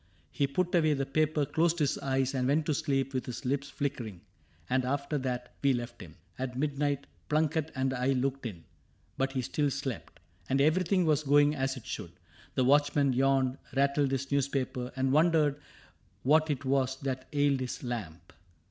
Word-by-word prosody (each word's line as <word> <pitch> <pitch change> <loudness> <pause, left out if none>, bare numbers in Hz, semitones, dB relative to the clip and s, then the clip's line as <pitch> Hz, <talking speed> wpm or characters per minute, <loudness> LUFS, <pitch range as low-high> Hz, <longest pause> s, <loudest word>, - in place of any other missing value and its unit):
He 140 - +1
put 180 +6 -1
away 155 -4 +4
the 135 0 -1
paper, 155 +1 +1
closed 160 +4 +1
his 150 -4 +1
eyes. 135 0 0
And 130 -2 0
went 150 +3 +2
to 155 - +1
sleep 135 -3 0
with 130 - -2
his 125 +2 -6
lips 140 +2 -1
flickering; 115 -10 -4 0.5
And 130 0 +1
after 140 +3 -1
that 125 -1 -4
we 140 -1 +4
left 120 -2 -5
him. 85 -4 -11
— 85 - -29
At 125 -1 -3
midnight 145 0 -1 0.2
Plunket 155 0 +1
and 130 0 0
I 130 +1 +1
looked 135 0 -1
in; 85 -7 -9 0.5
but 135 0 -1
he 130 -2 -1
still 145 +4 0
slept. 135 -4 -5 0.3
And 135 - +2
everything 180 +5 +3
was 155 -2 +3
going 145 0 +4
as 135 -2 -1
it 115 - -11
should. 85 - -6 0.4
The 130 - +3
watchman 145 0 +3
yawned, 135 0 +2 0.2
rattled 140 +1 +2
his 135 0 -2
newspaper. 135 -2 -1
And 130 0 +1
wondered 150 -1 +3 0.6
what 155 +4 +4
it 140 -2 -2
was 130 -1 +1
that 130 -1 -3
ailed 145 -2 +2
his 130 +1 -4
lamp. 90 -9 -6
135 Hz, 180 wpm, -30 LUFS, 130-145 Hz, 0.6 s, away